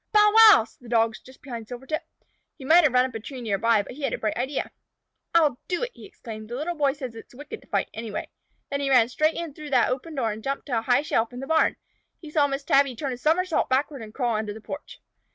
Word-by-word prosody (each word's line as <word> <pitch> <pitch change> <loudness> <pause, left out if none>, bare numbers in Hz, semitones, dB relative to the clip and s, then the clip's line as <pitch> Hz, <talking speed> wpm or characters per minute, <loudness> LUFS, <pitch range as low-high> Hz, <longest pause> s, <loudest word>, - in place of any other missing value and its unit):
"Bow 420 0 +6
wow!" 440 - +9
said 225 - -20
the 240 - -11
Dogs 225 -1 +1
just 260 0 -17
behind 235 -5 -7
Silvertip. 265 +7 -4 0.6
He 270 - -10
might 335 +5 +6
have 295 - +4
run 250 0 +5
up 260 - -6
a 225 - -4
tree 260 +4 -8
near 210 -5 -1
by, 230 -2 +3
but - - -10
he 275 +4 -10
had 275 - -1
a - - -1
bright 215 -1 -2
idea. 265 +4 -2 0.6
"I'll 300 -7 +4
do 360 +5 -1
it," - - -3
he - - -12
exclaimed. 220 - -10
"The 240 - -4
Little 310 +7 -2
Boy 285 -4 +1
says 260 -5 -7
it 225 - -11
is - - -20
wicked 300 - -9
to - - -21
fight, - - 0
anyway." 220 -2 -5 0.4
Then 280 - -1
he 280 -1 -1
ran 245 -3 +5
straight 310 +5 +1
in 335 -4 -5
through 300 +1 -9
that 255 -3 +3
open 300 +5 -4
door 235 -5 0
and 215 +1 -7
jumped 275 0 -3
to 250 -5 -1
a - - -5
high 245 +4 +2
shelf 230 -5 0
in 245 - -7
the 270 - -5
barn. 320 +2 +2 0.4
He 310 -3 -11
saw 295 -2 +3
Miss 275 0 -3
Tabby 275 -2 +3
turn 270 +1 -3
a - - -4
summersault 325 +7 +1
backward 270 +1 0
and 215 -1 -9
crawl 240 -1 -1
under 210 -1 -4
the - - -8
porch. 290 +7 -8
265 Hz, 270 wpm, -25 LUFS, 230-300 Hz, 0.6 s, wow